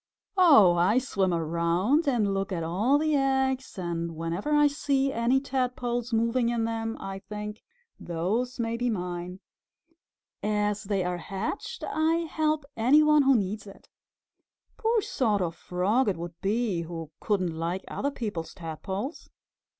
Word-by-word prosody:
"Oh, 280 - +7
I 185 +7 +3
swim 200 -8 +1
around 170 - +1
and 220 -7 +2
look 195 0 -2
at 170 -3 -2
all 205 - +2
the 310 +1 +1
eggs, 265 -3 0
and 170 -2 -3
whenever 165 - -3
I 295 0 +5
see 275 -1 +1
any 235 +3 +2
Tadpoles 250 -3 -2
moving 230 +1 +2
in 235 -1 0
them 225 0 -2
I 195 0 -6
think, 210 +2 -7 0.4
'Those 210 +10 -2
may 230 0 -1
be 245 +1 0
mine!' 180 -2 -4 1.0
As 210 0 0
they 195 -2 0
are 180 0 -2
hatched 195 - -5
I 325 +1 +1
help 310 -2 0
any 260 +7 +5
one 300 -1 +5
who 275 -1 +5
needs 205 0 -2
it. 195 - -14 0.9
Poor 455 0 +1
sort 210 -7 +1
of 165 -2 -2
Frog 205 +9 +1
it 185 - -1
would 170 +1 -6
be 205 -3 0
who 165 -2 -7
couldn't 185 -6 0
like 170 +3 -2
other 280 - -2
people's 205 - -5
Tadpoles!" 190 - -5
215 Hz, 150 wpm, -27 LUFS, 180-265 Hz, 1.0 s, Oh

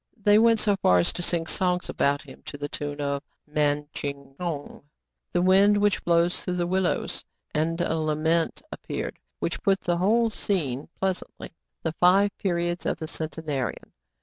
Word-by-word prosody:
They 205 0 +5
went 230 0 +5
so 205 -2 +2
far 90 - +4
as 90 - +2
to - - -4
sing 170 -1 0
songs 180 +1 0
about 140 +1 +1
him - - -13
to 145 - -6
the 145 0 -4
tune 145 0 -5
of 140 -1 -1 0.2
" - - -58
Man 150 -1 +1
Tchiang 140 -1 -6
Houng,*' 165 -5 -4 0.3
— - - -57
the 175 - +1
wind 195 +3 +5
which 205 -1 +2
blows 170 +1 +2
through 180 - -2
the 175 -1 0
willows. 185 0 -1 0.3
And 165 +2 0
a 165 - 0
lament 160 +2 0
appeared, - - -5 0.2
which - - -3
put 195 -3 +2
the 175 0 0
whole 225 +5 +3
scene 150 -11 -1
pleasantly: 190 -1 -3 0.3
"The 160 - 0
Five 195 +3 +5
Periods 175 -2 -1
of - - 0
the 160 - -5
Centenarian. 155 -4 -4
170 Hz, 175 wpm, -26 LUFS, 150-190 Hz, 0.3 s, They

